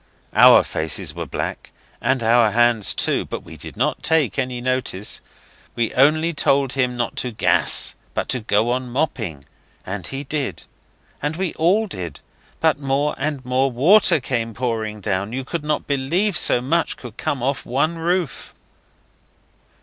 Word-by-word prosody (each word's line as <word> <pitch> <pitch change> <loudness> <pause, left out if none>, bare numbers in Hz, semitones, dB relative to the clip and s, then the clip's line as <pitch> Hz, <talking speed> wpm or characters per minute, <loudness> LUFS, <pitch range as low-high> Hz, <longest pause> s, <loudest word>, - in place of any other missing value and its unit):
Our - - +8
faces 80 -1 -2
were - - -5
black, - - -5 0.3
and 130 -2 +1
our 115 0 +4
hands 115 -1 +3
too, - - +1
but - - -6
we - - -11
did - - -10
not - - 0
take 160 -4 +1
any 125 -2 -2
notice; 125 -5 -2 0.5
we 115 -1 -1
only 155 +5 +3
told 140 -3 +1
him 125 -2 0
not 120 -1 -2
to 125 - -2
gas 110 - +2 0.2
but - - -1
to 130 - 0
go 110 +1 +1
on 125 0 -2
mopping. 110 - -2 0.4
And 95 0 -5
he 135 +1 -5
did. 145 -1 -3 0.6
And 150 +2 -2
we 185 -1 -2
all 190 +7 +2
did. 90 - -6 0.4
But 160 -3 +2
more 140 +1 0
and 145 -2 -3
more 130 +2 +1
water 160 - +5
came 115 -4 -3
pouring 110 -3 -3
down. 100 +4 -2
You 130 0 -3
would 165 -3 -1
not 150 0 -1
believe 165 +9 0
so 120 - +3
much 160 +6 0
could 120 -3 -11
come 145 -5 -2
off 135 +1 -1
one 155 +7 -1
roof. 175 -2 -2
130 Hz, 160 wpm, -21 LUFS, 120-150 Hz, 0.6 s, Our